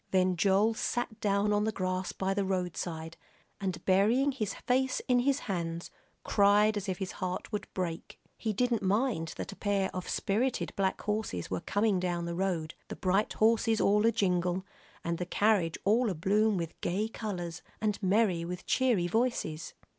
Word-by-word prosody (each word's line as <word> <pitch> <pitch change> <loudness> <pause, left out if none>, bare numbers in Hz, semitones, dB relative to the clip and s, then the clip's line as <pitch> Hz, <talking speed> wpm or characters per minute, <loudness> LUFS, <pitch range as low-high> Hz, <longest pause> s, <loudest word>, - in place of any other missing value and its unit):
Then 185 -1 +2
Joel 200 +5 +3
sat 240 0 -2
down 205 0 +2
on 205 0 +2
the 220 - +1
grass 185 -2 -2
by 190 0 -1
the 200 0 0
roadside, 175 -3 -3 0.4
and 185 -3 -3
burying 220 +9 +4
his 220 -7 -3
face 260 +1 +1
in 250 -1 +4
his 275 +2 +1
hands, 170 -3 -3 0.3
cried 205 +1 +4
as 205 -1 -3
if 185 - -2
his 190 0 -4
heart 180 +3 -4
would 210 - -4
break. 175 -3 -4 0.2
He 220 - -2
didn't 235 +2 +1
mind 195 -4 0
that - - -5
a - - -9
pair 200 -2 0
of 185 - -4
spirited 230 +5 0
black 190 -1 0
horses 210 - -2
were 90 - -1
coming 205 -2 +1
down 175 -1 -1
the 170 - -3
road, 170 -3 -1
the - - -6
bright 195 +3 +1
horses 225 0 +3
all 210 +1 +3
a - - +5
jingle, 180 -3 0 0.4
and 170 0 -2
the 180 - -1
carriage 195 -5 +2
all 225 +4 +3
a 185 - -2
bloom 205 +5 +2
with 165 -2 -5
gay 200 +5 0
colors, 180 -7 -5 0.2
and 210 -1 -1
merry 190 -3 +2
with 180 +1 -6
cheery 240 -9 +2
voices. 175 -7 -1
195 Hz, 175 wpm, -30 LUFS, 180-220 Hz, 0.4 s, a